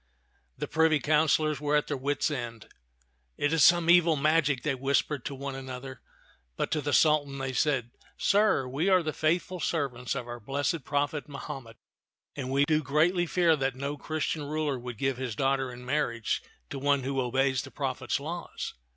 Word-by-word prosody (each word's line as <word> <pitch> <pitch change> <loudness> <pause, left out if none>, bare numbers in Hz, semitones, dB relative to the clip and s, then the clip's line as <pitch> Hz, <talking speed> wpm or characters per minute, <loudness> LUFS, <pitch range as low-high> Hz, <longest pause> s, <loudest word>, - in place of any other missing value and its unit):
The - - -4
privy 160 -1 +3
councilors 155 0 +2
were 150 0 +1
at 150 - +2
their 145 - -2
wits' 140 +3 -1
end. 120 -5 -5 0.7
"It 145 +2 +1
is 165 - +4
some 175 -1 +6
evil 170 -2 +6
magic," 150 -2 +2
they 150 - +1
whispered 135 +1 0
to 140 - -4
one 140 +1 -5
an 135 0 -7
other; 130 0 -7 0.5
but - - -2
to 150 - +1
the 145 +1 -2
Sultan 145 -2 +3
they 135 -1 -3
said, 130 -4 +1 0.3
"Sir, 200 -10 +3
we 145 +9 0
are 185 -2 +4
the 155 -1 -2
faithful 175 +3 0
servants 130 -8 -2
of 120 - -4
our 120 0 -6
blessed 140 +6 -2
prophet 145 +1 -1
Mahomet; 135 -4 -8 0.6
and 130 -3 -4
we 140 +2 +3
do 155 0 +2
greatly 165 +5 +2
fear 170 -1 +3
that 135 -2 -1
no 140 +2 -3
Christian 155 0 -3
ruler 150 -2 -1
would 120 -2 -7
give 135 +1 0
his 125 -4 -4
daughter 135 0 0
in 125 0 -10
marriage 125 -5 -1 0.3
to - - -4
one 140 -1 +2
who 135 0 -1
obeys 130 +1 +1
the 135 - -9
pro 135 -1 -2
phet's 135 - -2
laws." 170 +4 -5
140 Hz, 185 wpm, -28 LUFS, 130-155 Hz, 0.7 s, some